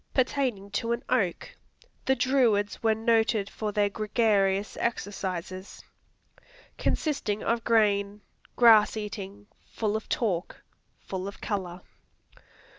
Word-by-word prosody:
Pertaining 250 -6 0
to 230 +3 -1
an 235 - -4
oak; 205 -9 0 0.5
"The 265 - +3
Druids 240 -6 +2
were 220 -1 +3
noted 220 -2 +1
for 215 -1 -3
their 205 0 +2
gregarious 205 -2 +1
exercises." 190 -4 -4 1.0
Consisting 220 -9 -1
of 230 0 0
grain. 205 -2 +2 0.3
Grass 220 -3 +6
eating. 205 -1 -6 0.3
Full 215 -2 -1
of 220 - -4
talk. 190 -7 -2 0.4
Full 190 0 -5
of 200 - -8
color. 190 -4 -4
210 Hz, 110 wpm, -27 LUFS, 200-230 Hz, 1.0 s, Grass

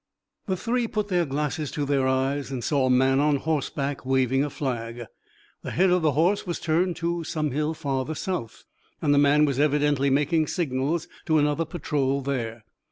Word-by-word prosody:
The 190 -2 0
three 240 +3 0
put 210 -2 -2
their 175 -2 +2
glasses 150 +1 -2
to 145 - -1
their 135 -2 +1
eyes 135 +2 0
and 130 -3 -4
saw 140 -1 +1
a - - +1
man 130 +1 +4
on 150 0 +3
horseback 145 -1 -2
waving 130 0 +2
a 145 - -2
flag. 120 -4 -4 0.6
The - - -6
head 185 +1 +2
of 180 0 +3
the 155 -2 +2
horse 180 +7 +1
was 175 - -3
turned 170 +2 +1
toward 170 -1 -2
some 155 -2 -1
hill 150 +4 -1
farther 135 +1 -2
south, 145 -12 -4 0.4
and 145 -2 +2
the 140 - +4
man 145 +1 +5
was 140 -2 -1
evidently 145 -1 +2
making 150 +3 +2
signals 150 0 -1 0.2
to 160 -1 +3
another 150 +2 +1
patrol 140 -4 -1
there. 120 -5 -3
145 Hz, 185 wpm, -25 LUFS, 135-160 Hz, 0.6 s, man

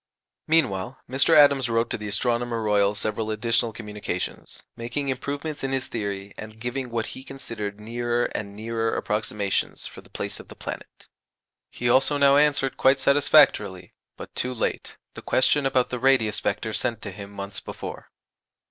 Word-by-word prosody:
Meanwhile, 130 -7 +1
Mr. 135 +5 +4
Adams 140 -4 +6
wrote 115 0 +1
to - - -1
the 105 - -5
Astronomer 120 +2 0
Royal 105 -1 +3
several 110 +1 -2
additional 115 +1 +1
communications, 105 -4 -6
making 120 +4 -3
improvements 145 +3 -4
in 135 0 -1
his 130 -1 0
theory, 100 -4 -4
and 110 0 -9
giving 125 +2 -3
what 115 -1 -2
he 130 - -9
considered 105 -7 -6
nearer 120 +2 -1
and 100 -1 -5
nearer 115 +1 -2
approximations 105 -1 -2
for - - -9
the - - -20
place - - -4
of - - -12
the - - -12
planet. - - -8 0.6
He 120 - -3
also 135 +4 +4
now 140 0 +5
answered 145 -2 +3
quite 135 +1 +5
satisfactorily, 140 -9 +4 0.2
but - - -9
too 125 0 -2
late, - - -3 0.2
the - - -9
question 135 +2 +3
about 130 -2 +1
the 125 - -2
radius 120 -5 +3
vector 110 -1 -2
sent 115 +1 -1
to 105 - -5
him 100 +1 -9
months 100 0 -6
before. - - -8
115 Hz, 165 wpm, -25 LUFS, 105-135 Hz, 0.6 s, Adams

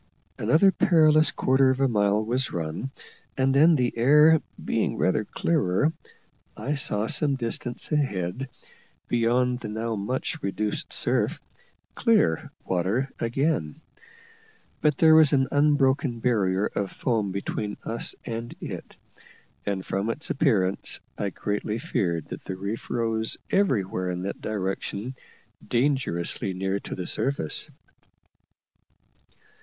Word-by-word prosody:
Another 155 - +4
perilous 155 -4 +4
quarter 130 0 +3
of 130 0 0
a 135 - +3
mile 105 -2 +2
was 125 +3 -1
run, 80 +9 -3 0.5
and 135 0 +2
then, 155 +4 +6
the 125 -4 0
air 150 +6 +6 0.2
being - - 0
rather - - +1
clearer, 95 - +1 0.6
I 145 - -2
saw, 110 -7 0
some 140 +3 +1
distance 120 +1 -4
ahead, 130 - -1 0.6
beyond 125 +1 +1
the 115 - -6
now 110 +2 -3
much 130 - -3
reduced 105 +2 -3
surf, - - +1 0.5
clear 210 - +2 0.2
water 95 +10 0
again; 115 - -1 1.0
but 150 -2 +2
there 160 -1 +6
was 155 -2 +6
an 135 -1 +3
unbroken 140 -3 +2
barrier 100 -5 +1
of 100 -2 -3
foam 110 -5 -1
between 105 +2 -3
us 115 +1 -2
and 115 0 -5
it, - - -7 0.7
and 95 -2 -2
from 100 +3 -2
its 140 +7 -3
appearance 105 - +1 0.2
I 100 - -2
greatly 105 +3 -3
feared 85 -8 -2
that - - -7
the 95 - -4
reef 100 +4 -5
rose 115 -2 0
everywhere 100 - +1
in 90 0 -3
that 100 - -5
direction 100 +3 -3 0.5
dangerously 120 - 0
near 95 +1 -1
to - - -7
the 90 - -5
surface. 135 - 0
115 Hz, 125 wpm, -26 LUFS, 100-135 Hz, 1.0 s, then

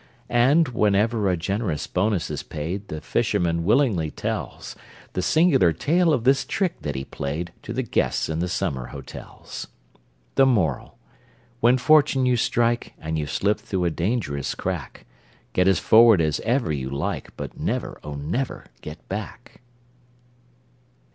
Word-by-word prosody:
And, 135 +6 +4
whenever 105 -1 +2
a 90 - +1
generous 95 -2 -2
bonus 95 -2 0
is - - -3
paid, 85 +7 -5
The 80 0 -6
fisherman 85 +1 0
willingly 105 - +2
tells - - -5 0.4
The 90 - -1
singular 140 - +4
tale 165 - +2
of 125 -7 +1
this 135 +2 +4
trick 180 +6 -2
that 75 -2 -3
he 65 0 -4
played, 80 +5 -4
To - - -7
the 130 +3 -1
guests 120 - 0
in 80 0 -2
the 90 - 0
summer 65 -7 -2
hotels. 70 -2 -9 0.7
The 135 -1 +5
Moral: 90 - 0 0.6
When 120 +1 +4
fortune 140 -1 +4
you 125 -1 +3
strike, 120 0 0
And 80 0 -3
you've 75 -2 -3
slipped 105 +10 0
through 95 -3 -2
a 85 - +1
dangerous 80 - -2
crack, - - -5 0.5
Get 90 0 +3
as 95 - +4
forward 110 -3 +6
as 75 -2 +1
ever 120 - 0
you 65 -3 -3
like, 70 +1 -4
But - - -7
never, - - -3
oh, 75 -1 -6
never 95 - -3 0.2
get 75 +3 -10
back! 110 +5 -7
100 Hz, 150 wpm, -24 LUFS, 80-125 Hz, 0.7 s, forward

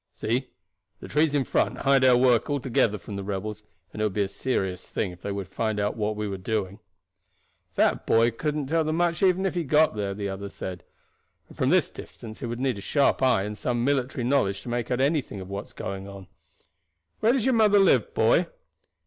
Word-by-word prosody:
See, 125 +4 -2 0.5
the - - -9
trees 150 0 +2
in 140 - +2
front - - 0
hide 135 -1 +3
our 125 -1 +6
work 125 +1 +3
altogether 125 -6 +1
from 100 +1 -8
the 100 - -4
rebels, 105 +2 -4 0.3
and 110 - -5
it - - +2
would 105 - -2
be 105 - +2
a - - -2
serious 95 -5 -3
thing 95 - -2
if 90 0 -14
they 100 - -4
were 100 -1 -4
to 95 - -26
find 110 0 -1
out 105 +1 -1
what 105 -1 -1
we 105 0 -3
are 100 -2 -4
doing." 100 0 -3 1.0
"That - - +1
boy 115 +1 +4
could 150 +6 -3
not 145 -3 -3
tell 160 +2 +1
them 155 0 -1
much 170 -1 0
even 190 0 +3
if 190 - 0
he 175 -1 -1
got 155 -2 +3
there," 100 -2 -2
the 100 0 -3
other 100 +1 -5
said; 90 -3 -7 0.7
"and - - -14
from - - +1
this - - +3
distance 110 +1 -10
it 125 - -3
would 120 +1 -4
need 130 -5 -1
a - - -8
sharp 140 +6 +2
eye 130 -7 +3
and 105 +1 -5
some 120 +2 -1
military 130 -3 0
knowledge 115 -7 +1
to - - -7
make 120 -1 -2
out 125 0 0
anything 140 -7 0
of 95 0 -8
what 100 +1 -4
is - - -18
going 95 0 -6
on. 100 -1 -10 0.9
Where 230 +2 +3
does 260 -5 0
your 265 - +3
mother 215 -3 +5
live, 195 - +3
boy?" - - +3
115 Hz, 230 wpm, -26 LUFS, 100-140 Hz, 1.0 s, our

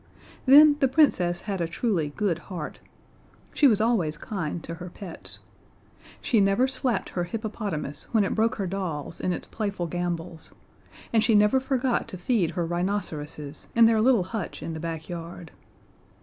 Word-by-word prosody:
Then 290 +2 +8
the 270 - +4
Princess 215 - +3
had 195 -4 -3
a 170 - 0
truly 165 -4 -1
good 190 -6 0
heart: 175 -5 -6 0.7
She 290 - +5
was 215 -5 +4
always 205 -10 +1
kind 170 -5 -4
to 170 - -6
her 180 - -6
pets. 175 -1 -9 0.8
She 225 -4 +2
never 195 +6 +3
slapped 255 -5 -1
her 175 -1 -2
hippopotamus 205 -7 -4
when 220 -3 +3
it 195 - -1
broke 225 +3 +1
her 200 - -2
dolls 170 -5 -4
in 185 - 0
its - - -4
playful 200 -5 -3
gambols, 175 -1 -4 0.6
and 220 -1 +4
she 220 0 +4
never 210 +5 +5
forgot 260 -2 0
to 185 - -7
feed 180 -2 +1
her 170 - +1
rhinoceroses 165 -5 -3
in 230 0 +7
their 225 -1 +4
little 235 -4 +4
hutch 190 0 -5
in 165 - -4
the 160 - -5
backyard. 165 0 -6
190 Hz, 165 wpm, -26 LUFS, 170-225 Hz, 0.8 s, Then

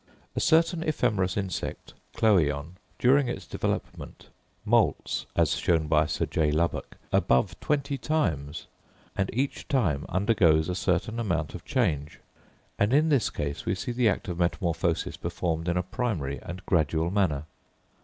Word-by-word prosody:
A - - 0
certain 165 +1 +3
ephemerous 110 - 0
insect 95 -4 -4 0.2
(Chlöeon) 80 -8 +2 0.3
during 130 +1 +4
its - - -5
development, - - -4 0.4
moults, - - +1
as - - +3
shown 80 -2 +1
by 75 0 +3
Sir - - -1
J. 80 -2 +1
Lubbock, 85 +3 -1
above 65 0 +3
twenty 140 -2 -1
times, 80 - -1 0.5
and 95 - 0
each 135 +5 -2
time 90 - +1
undergoes 90 -5 +3
a - - 0
certain 90 +5 0
amount 85 -9 -1
of 90 - -9
change; 80 - -1 0.6
and 105 +4 +2
in 155 +3 +4
this 140 -7 +3
case 70 0 -4
we - - +1
see 95 +6 -4
the 120 -2 +3
act 100 - -2
of 90 -1 -4
metamorphosis 85 -1 0
performed 80 -1 -2
in 90 0 +1
a 90 - +1
primary 90 - -2
and 90 +2 -8
gradual 80 0 +1
manner. 95 -8 +1
90 Hz, 145 wpm, -27 LUFS, 80-120 Hz, 0.6 s, during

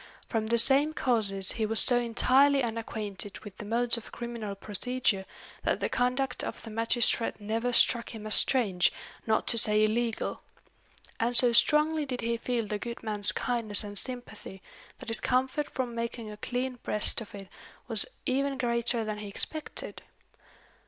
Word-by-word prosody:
From 220 -2 -2
the 235 +1 +1
same 280 +6 +6
causes 205 -9 0
he 220 - -2
was 225 +1 +3
so 245 -2 +4
entirely 260 +4 +2
unacquainted 220 -3 -4
with 200 -3 -12
the - - -7
modes 235 +2 -1
of 230 - -11
criminal 235 -4 -7
procedure, 205 -1 -2 0.3
that - - -1
the - - -2
conduct 250 +2 -1
of - - -7
the 225 - -9
magistrate 230 +1 0
never 225 +4 -3
struck 235 -1 +3
him 220 -2 -9
as 215 - +1
strange, 200 -9 +4 0.4
not 220 0 +1
to 230 - +3
say 210 0 +4
illegal. 225 +1 -2 0.8
And 240 +1 +4
so 245 -1 +8
strongly 300 +4 +3
did 250 -2 -5
he 235 0 -2
feel 235 -1 -3
the 210 0 -5
good 235 +1 -8
man's 210 -2 +2
kindness 230 -4 0
and 205 0 -9
sympathy, 240 -4 -4 0.3
that - - -10
his 225 - +2
comfort 265 +4 -1
from 250 -2 -4
making 230 -1 -6
a 210 - -10
clean 250 +3 -4
breast 210 +2 -1
of 210 - -11
it 195 -1 -10 0.4
was - - +6 0.2
even 275 +1 -1
greater 235 -2 +1
than 215 -1 -5
he 210 - -8
expected. 305 +9 -2
230 Hz, 165 wpm, -28 LUFS, 215-250 Hz, 0.8 s, so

